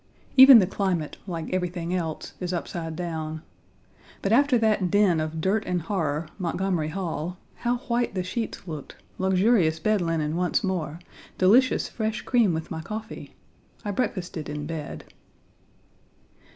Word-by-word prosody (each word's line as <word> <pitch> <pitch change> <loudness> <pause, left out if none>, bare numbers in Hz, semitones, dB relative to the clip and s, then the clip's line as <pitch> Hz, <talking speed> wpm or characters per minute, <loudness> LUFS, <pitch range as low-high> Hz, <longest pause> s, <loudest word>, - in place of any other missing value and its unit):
Even 265 -1 +11
the 200 - +5
climate, 180 -5 -2
like 170 -1 -4
everything 180 -1 -2
else, 165 -4 -3
is 180 0 -3
upside 165 -2 -4
down. 160 -2 -4 0.8
But 195 - 0
after 270 +2 +5
that 215 -5 +2
den 195 -4 +3
of 155 +1 -3
dirt 195 +6 +1
and 180 -2 -1
horror, 160 -4 -1
Montgomery 180 -2 -1
Hall, 175 0 -4 0.2
how 240 0 0
white 240 -3 0
the 185 - -1
sheets 220 +2 -4
looked, 155 -4 -7 0.2
luxurious 190 -3 +3
bed 215 +2 +1
linen 160 -2 -1
once 180 +4 +1
more, 165 -6 -2 0.4
delicious 235 +8 +4
fresh 220 -1 -3
cream 235 -7 +3
with 160 -1 -4
my 160 - -4
coffee! 220 +6 -7 0.5
I 205 - -1
breakfasted 185 - -3
in 150 0 -4
bed. 155 -2 -6
180 Hz, 140 wpm, -26 LUFS, 160-210 Hz, 0.8 s, Even